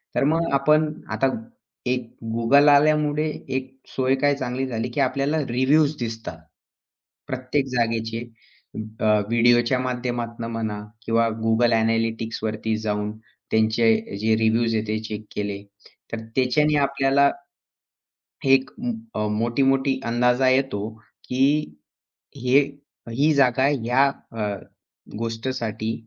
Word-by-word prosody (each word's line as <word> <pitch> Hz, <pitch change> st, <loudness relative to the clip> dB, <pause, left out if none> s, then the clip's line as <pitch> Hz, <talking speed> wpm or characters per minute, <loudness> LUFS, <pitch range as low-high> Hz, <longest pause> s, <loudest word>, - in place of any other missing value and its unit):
तर -, -, +2 dB
मग 165 Hz, +3 st, +1 dB
आपण 150 Hz, +3 st, +3 dB, 0.2 s
आता 135 Hz, -, +1 dB, 0.6 s
एक 125 Hz, 0 st, 0 dB, 0.3 s
Google 140 Hz, +6 st, +5 dB
आल्यामुळे 150 Hz, +1 st, +3 dB, 0.3 s
एक 130 Hz, 0 st, -3 dB, 0.2 s
सोय 130 Hz, 0 st, +2 dB
काय 145 Hz, +1 st, +2 dB
चांगली 130 Hz, -1 st, -3 dB
झाली, 115 Hz, -1 st, -3 dB
की 120 Hz, -, -4 dB
आपल्याला 140 Hz, +3 st, +1 dB
रिव्ह्यूज 140 Hz, +5 st, +3 dB
दिसतात. 115 Hz, -7 st, -5 dB, 0.9 s
प्रत्येक 130 Hz, +1 st, -1 dB
जागेचे, 115 Hz, -2 st, -1 dB, 0.8 s
अ, -, -, -4 dB, 0.3 s
व्हिडिओच्या 120 Hz, +2 st, +3 dB
माध्यमातून 120 Hz, -2 st, -3 dB
म्हणा 110 Hz, -2 st, -3 dB, 0.3 s
किंवा 115 Hz, 0 st, +2 dB, 0.2 s
Google 115 Hz, +1 st, +3 dB
ॲनालिटिक्सवरती 115 Hz, -1 st, -1 dB
जाऊन, 105 Hz, -1 st, -2 dB, 0.4 s
त्यांचे 110 Hz, -1 st, +2 dB
जे 110 Hz, 0 st, +3 dB
रिव्ह्यूज 115 Hz, +1 st, +2 dB
आहेत. 110 Hz, 0 st, -1 dB
ते 110 Hz, 0 st, -1 dB
चेक 110 Hz, -1 st, -6 dB
केले 100 Hz, -1 st, -3 dB, 0.5 s
तर 115 Hz, -, -3 dB, 0.2 s
त्याच्याने 150 Hz, +4 st, +2 dB
आपल्याला 140 Hz, 0 st, +3 dB, 1.1 s
फेक 135 Hz, -1 st, +4 dB, 0.5 s
अ, 105 Hz, -, 0 dB
मोठी-मोठी 130 Hz, +5 st, +1 dB
अंदाजा 125 Hz, +2 st, +2 dB
येतो, 130 Hz, -6 st, +1 dB, 0.4 s
की 135 Hz, -, +1 dB, 0.6 s
हे, 125 Hz, +2 st, +4 dB, 0.5 s
ही 145 Hz, +6 st, +2 dB
जागा 130 Hz, -2 st, +3 dB
ह्या 130 Hz, -1 st, +2 dB, 0.3 s
अ, 110 Hz, -2 st, -3 dB, 0.7 s
गोष्टीसाठी 115 Hz, -1 st, -3 dB
120 Hz, 110 wpm, -23 LUFS, 115-135 Hz, 1.1 s, Google